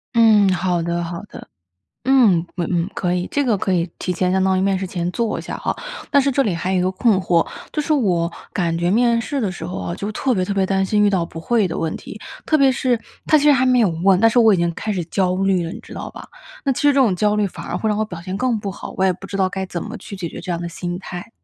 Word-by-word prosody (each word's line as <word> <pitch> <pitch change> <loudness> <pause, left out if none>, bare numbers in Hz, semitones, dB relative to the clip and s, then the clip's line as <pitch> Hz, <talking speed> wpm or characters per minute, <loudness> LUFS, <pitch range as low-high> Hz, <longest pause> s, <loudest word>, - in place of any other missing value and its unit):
嗯， 215 -4 +6
好 180 -1 0
的， 170 +1 -1
好 170 +1 -5
的。 - - -11 0.6
嗯， 225 -11 +4
嗯 175 -2 -1
嗯， 175 +1 0
可 180 -1 -1
以， 180 0 -1
这 285 - +1
个 235 -5 +2
可 190 - -1
以 175 -1 0
提 180 - -2
前 180 +1 0
相 190 0 +2
当 190 0 +2
于 - - +1
面 195 -1 +1
试 190 - -3
前 175 -1 -3
做 230 +2 -1
一 - - -6
下 - - -5
哈。 - - -2 0.4
但 285 - +5
是 275 - +2
这 275 +1 +2
里 205 -8 0
还 180 +3 -2
有 185 - +2
一 - - +1
个 185 - +1
困 195 +2 +2
惑， 170 -3 +2 0.3
就 305 - -1
是 310 - 0
我 180 - +1 0.2
感 170 -4 0
觉 175 +1 0
面 235 +2 +3
试 275 +4 -3
的 210 -5 0
时 165 -3 -7
候 180 - -5
啊， 90 -2 -4
就 205 - -4
特 265 +4 0
别 185 - 0
特 200 - -3
别 195 -1 +2
担 195 0 +1
心 210 +2 +2
遇 205 - +4
到 185 -4 +1
不 165 - -9
会 220 +3 +2
的 165 - -4
问 160 -1 -2
题。 - - -10 0.3
特 310 - +3
别 275 -3 +5
是 250 -2 +1 0.3
他 310 - +5
其 295 - +2
实 295 - +7
还 260 -1 +3
没 250 -1 +4
有 220 - +4 0.2
问， 195 -2 +5
但 225 - +6
是 245 - +2
我 225 -3 +6
已 - - +2
经 170 -1 0
开 215 - -3
始 180 -4 -2
焦 185 +1 0
虑 190 -2 +1
了， 165 - -5
你 - - -7
知 - - -14
道 - - -6
吧？ - - -11 0.4
那 275 - +2
其 - - -4
实 290 - +5
这 285 - +4
种 255 -8 +4
焦 210 +3 +2
虑 210 -1 +2
反 190 - -8
而 - - -3
会 220 - -1
让 210 - 0
我 215 - +1
表 180 -6 -8
现 185 +2 -4
更 245 0 0
不 205 -1 -4
好， 190 - -8
我 190 - +1
也 190 - +4
不 180 - -10
知 195 - -5
道 190 -1 +2
该 190 0 -4
怎 175 -2 -5
么 230 +2 -6
去 200 - -9
解 180 -3 -4
决 - - -8
这 185 - -6
样 170 - -3
的 170 - -4
心 175 +1 -5
态。 185 +2 -8
190 Hz, 330 characters per minute, -20 LUFS, 175-225 Hz, 0.6 s, 实